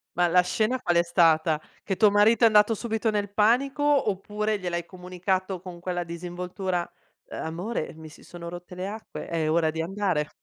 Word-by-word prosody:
Ma 175 0 +3
la 180 +1 +5
scena 220 +7 0
qual 175 -8 +1
è 170 - +5
stata? 160 -3 +3 0.2
Che 190 - -2
tuo 210 0 +5
marito 210 +4 +4
è - - +9
andato 215 +1 +5
subito 225 0 -1
nel 205 -1 -1
panico 250 +7 +2
oppure 215 -6 +1
gliel'hai 175 -2 -3
comunicato 185 +1 -3
con 180 -1 -10
quella 175 0 -3
disinvoltura? 180 +1 -4 0.4
"Amore 175 +5 -4
mi 160 -1 -11
si - - -16
sono 170 -1 -9
rotte 175 +1 -8
le 185 +1 -4
acque, 215 +2 -7
è 160 -2 -1
ora 160 -1 +2
di 160 +1 -3
andare." 180 -4 -1
180 Hz, 180 wpm, -26 LUFS, 170-210 Hz, 0.4 s, è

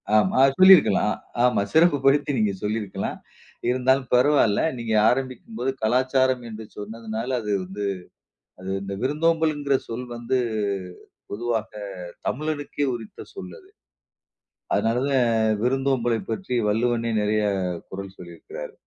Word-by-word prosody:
ஆமா, 110 +4 +3 0.2
சொல்லிருக்கலாம். 185 - +6 0.3
ஆமா, 125 -5 +3
சிறப்பு 160 -1 +5
படுத்தி 145 +1 +3
நீங்க 105 -2 +2
சொல்லிருக்கலாம். 105 -2 -3 0.5
இருந்தாலும் 130 +1 +2
பரவால்ல. 125 -4 +4 0.2
நீங்க 115 -2 -3 0.2
ஆரம்பிக்கும்போது 130 -1 -2
"கலாச்சாரம்" 130 +2 +2
என்று 110 0 -8
சொன்னதனால, 110 +2 -5
அது 105 -1 -4
வந்து 100 +3 -5 0.8
அது 95 - -6
இந்த 100 0 -5
விருந்தோம்பல்ங்கிற 150 -1 +1
சொல் 120 +2 -5
வந்து 120 +2 -1 0.9
பொதுவாக 115 0 -2 0.6
தமிழனுக்கே 145 0 -2
உரித்த 115 -3 -9
சொல் 90 -2 -8
அது. - - -20 1.0
அதனால 115 +2 +1
தான் 115 -5 +2
விருந்தோம்பலை 130 -3 +1
பற்றி 125 +2 -3
வள்ளுவனே 115 +2 0
நெறைய 105 +1 +1 0.5
குறள் 95 0 -7
சொல்லியிருக்கிறாரு. 85 -2 -9
120 Hz, 110 wpm, -24 LUFS, 110-135 Hz, 1.0 s, சொல்லிருக்கலாம்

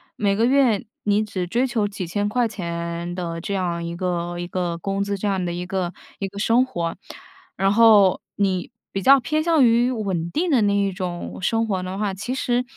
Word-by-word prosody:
每 200 -2 +1
个 225 +3 +2
月 250 -5 +3 0.2
你 205 +1 +2
只 185 -4 -4
追 240 +8 +1
求 230 -5 0
几 200 -2 -5
千 205 +4 -1
块 240 +2 +1
钱 170 -3 -4
的 170 -2 -4
这 200 +3 -3
样 175 -3 -2
一 170 0 -4
个 175 -1 -2
一 175 - -3
个 175 -2 -2
工 195 +3 -2
资， 200 0 -2
这 205 - -2
样 190 -2 0
的 175 - -2
一 175 +1 -4
个 185 -1 -2 0.3
一 195 - -2
个 200 +1 -12
生 230 +4 +3
活。 170 -10 -3 0.6
然 195 +1 +2
后 210 -4 +6
你 190 -1 -1 0.2
比 195 - -2
较 275 +7 +7
偏 305 +5 -1
向 320 -5 +4
于 235 +1 +4
稳 190 -8 -2
定 335 - -1
的 255 -5 +4
那 205 -1 +2
一 200 -1 +1
种 180 -1 -5
生 225 +4 +1
活 190 -3 -1
的 185 +1 -5
话， 205 -1 -1
其 205 +7 -4
实， 245 -1 0
195 Hz, 230 characters per minute, -22 LUFS, 180-225 Hz, 0.6 s, 较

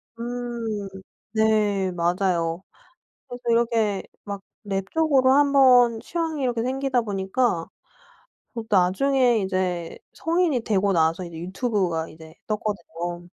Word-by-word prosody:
음 235 -3 -4 0.5
네 210 -3 +2
맞아요. 175 -1 0 0.6
그래서 245 0 -8
이렇게 230 -4 +1 0.2
막 200 -1 -6 0.3
랩 195 -1 -2
쪽으로 280 -5 +3
한번 265 -4 +5
취향이 320 +1 -3
이렇게 240 -3 0
생기다 260 0 0
보니까 195 -2 -1 0.9
그 230 -2 -4
나중에 235 +6 +3
이제 185 -3 -2
성인이 330 -5 +1
되고 200 -2 +2
나서 165 +1 +1
이제 170 -2 -9
유튜브가 185 -3 -1
이제 160 0 -14
떴거든요. 175 -5 -4
210 Hz, 245 characters per minute, -24 LUFS, 185-245 Hz, 0.9 s, 한번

